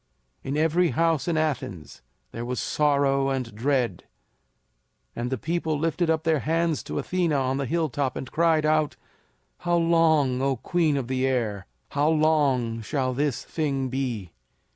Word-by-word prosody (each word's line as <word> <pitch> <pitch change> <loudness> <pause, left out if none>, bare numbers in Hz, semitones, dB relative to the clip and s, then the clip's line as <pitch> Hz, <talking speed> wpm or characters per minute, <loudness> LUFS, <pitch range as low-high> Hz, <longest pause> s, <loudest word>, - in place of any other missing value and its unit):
In 135 +2 -2
every 165 +3 +3
house 165 +3 +1
in 170 -2 +1
Athens 125 - -3 0.3
there 115 - -5
was 125 +1 -3
sorrow 140 -2 +2
and 130 -4 -3
dread, 120 -4 -1 1.1
and 120 +1 -3
the 130 - -1
people 160 +2 -1
lifted 165 +2 0
up 160 -1 +1
their 160 -2 +2
hands 165 +2 0
to - - -4
Athena 175 -4 0
on 135 -1 0
the 140 -2 -2
hilltop 145 -4 -1
and 130 - -6
cried 160 -2 +2
out, 155 -1 +2 0.6
"How 175 0 0
long, 160 -6 +3
O 135 0 +1
Queen 155 +3 +1
of 130 -3 -3
the 130 0 0
Air, 110 -7 -1 0.2
how 145 +2 +1
long 145 -7 +2
shall 130 +2 -1
this 140 0 -1
thing 135 -5 -2
be?" 120 -9 -3
140 Hz, 155 wpm, -25 LUFS, 130-160 Hz, 1.1 s, every